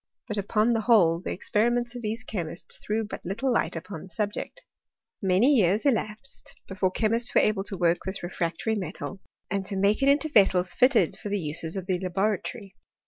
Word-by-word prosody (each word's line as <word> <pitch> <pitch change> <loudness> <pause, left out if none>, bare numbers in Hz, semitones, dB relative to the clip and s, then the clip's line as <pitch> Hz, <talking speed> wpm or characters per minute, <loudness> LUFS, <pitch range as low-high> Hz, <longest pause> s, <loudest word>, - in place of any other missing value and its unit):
But 210 -3 -2
upon 215 +3 +1
the 225 - +1
whole 195 -8 +4
the 185 - -6
experiments 240 +5 0
of 245 - -7
these 220 +1 -3
chemists 175 -6 -2
threw 220 +1 -2
but 215 - -7
little 235 +8 -1
light - - 0
upon 180 -7 -7
the 190 - -12
subject. 210 - -4 0.6
Many 195 +8 +4
years 210 -1 +3
elapsed 225 -1 -2
before 190 -1 0
chemists 230 +4 +1
were - - +7
able 210 -2 +1
to 195 - -5
work 170 -1 +2
this 190 -1 -4
refractory 175 +4 -2
metal, 190 0 -5 0.3
and 200 0 0
to 195 - -4
make 200 +4 +2
it 275 - +4
into 285 +2 +3
vessels 190 - +3
fitted 250 - +3
for 205 - -6
the 205 - 0
uses 160 +1 -3
of 190 -2 -4
the 185 -2 -1
laboratory. 195 +2 -2
205 Hz, 190 wpm, -26 LUFS, 185-230 Hz, 0.6 s, were